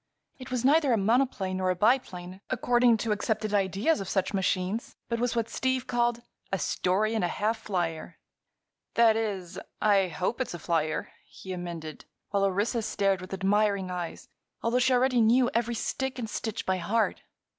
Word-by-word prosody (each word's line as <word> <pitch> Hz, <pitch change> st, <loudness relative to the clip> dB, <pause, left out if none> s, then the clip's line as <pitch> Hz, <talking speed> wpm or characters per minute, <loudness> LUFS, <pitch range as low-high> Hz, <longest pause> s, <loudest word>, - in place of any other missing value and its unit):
It 255 Hz, -, -9 dB
was 255 Hz, -1 st, -1 dB
neither 290 Hz, 0 st, +4 dB
a -, -, +3 dB
monoplane 210 Hz, -3 st, +1 dB
nor 185 Hz, 0 st, 0 dB
a 185 Hz, -, +2 dB
biplane, 190 Hz, -4 st, 0 dB
according 245 Hz, -1 st, +3 dB
to 220 Hz, +1 st, -2 dB
accepted 215 Hz, 0 st, -1 dB
ideas 200 Hz, -, +1 dB
of 190 Hz, -, -5 dB
such 190 Hz, +1 st, 0 dB
machines, 190 Hz, +3 st, -1 dB
but 235 Hz, -1 st, -1 dB
was 245 Hz, 0 st, 0 dB
what 230 Hz, -1 st, 0 dB
Steve 260 Hz, 0 st, -1 dB
called 240 Hz, -1 st, 0 dB, 0.3 s
"a 195 Hz, -, +1 dB
story 195 Hz, +4 st, 0 dB
and 220 Hz, -, 0 dB
a -, -, +2 dB
half 215 Hz, +5 st, -1 dB
flyer." 175 Hz, -5 st, -3 dB, 0.8 s
"That 230 Hz, -1 st, +5 dB
is, 200 Hz, -6 st, -3 dB, 0.2 s
I 200 Hz, -3 st, +4 dB
hope 185 Hz, -, -2 dB
it's 250 Hz, -, -3 dB
a -, -, -5 dB
flyer," 160 Hz, -2 st, -1 dB, 0.2 s
he 190 Hz, -, -8 dB
amended, 170 Hz, -3 st, -6 dB, 0.3 s
while 200 Hz, -1 st, +2 dB
Orissa 205 Hz, +5 st, 0 dB
stared 195 Hz, -3 st, 0 dB
with 185 Hz, -, -9 dB
admiring 195 Hz, 0 st, +1 dB
eyes, 175 Hz, -2 st, -5 dB, 0.4 s
although 235 Hz, +2 st, +2 dB
she 260 Hz, +1 st, +3 dB
already 250 Hz, -1 st, +3 dB
knew 240 Hz, +3 st, +4 dB
every 235 Hz, +1 st, 0 dB
stick 265 Hz, +3 st, -2 dB
and 235 Hz, -3 st, -3 dB
stitch 220 Hz, 0 st, -4 dB
by 190 Hz, 0 st, +1 dB
heart. 205 Hz, +6 st, 0 dB
210 Hz, 175 wpm, -28 LUFS, 185-240 Hz, 0.8 s, That